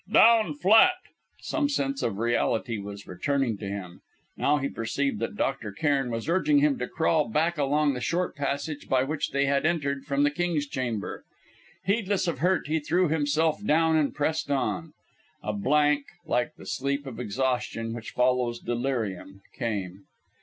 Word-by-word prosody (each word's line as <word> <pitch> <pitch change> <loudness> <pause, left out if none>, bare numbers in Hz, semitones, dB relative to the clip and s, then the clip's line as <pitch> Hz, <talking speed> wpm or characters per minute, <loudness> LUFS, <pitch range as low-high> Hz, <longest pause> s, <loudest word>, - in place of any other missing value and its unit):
"Down 220 -9 +6
flat!" 220 - +6 0.5
Some 295 -3 0
sense 275 -1 -1
of 100 -4 -1
reality 115 0 0
was 100 0 -8
returning 120 +3 -1
to 100 - -5
him. 95 -3 -6 0.3
Now 145 +1 +2
he 140 -1 -1
perceived 135 0 -2
that 115 - -3
Dr. 135 -6 -2
Cairn 135 +3 0
was 115 -1 -4
urging 240 - +3
him 285 -3 +3
to - - -2
crawl 160 -3 +1
back 160 +6 +1
along 145 +1 +2
the 125 - -5
short 175 +8 -1
passage 145 +1 -3
by 130 -1 +3
which 150 +2 -2
they 140 0 +1
had 140 0 +1
entered 140 -4 0
from 140 0 +1
the 145 - +3
King's 165 -1 -1
Chamber. 125 -7 -4 0.6
Heedless 200 -2 +1
of 160 -6 -2
hurt, 180 +4 +2
he 160 +2 0
threw 175 +3 +1
himself 155 +3 +1
down 160 -2 +3
and 155 -3 +2
pressed 155 +2 -1
on. 150 +3 -1 0.5
A 105 - -2
blank, 145 +6 +2 0.2
like 120 0 0
the - - -13
sleep 140 +7 -2
of 125 -4 -7
exhaustion 120 -1 -2
which 115 -1 -7
follows 125 -1 +1
delirium, 115 -6 -3
came. 100 -5 -4
140 Hz, 165 wpm, -27 LUFS, 120-160 Hz, 0.6 s, Down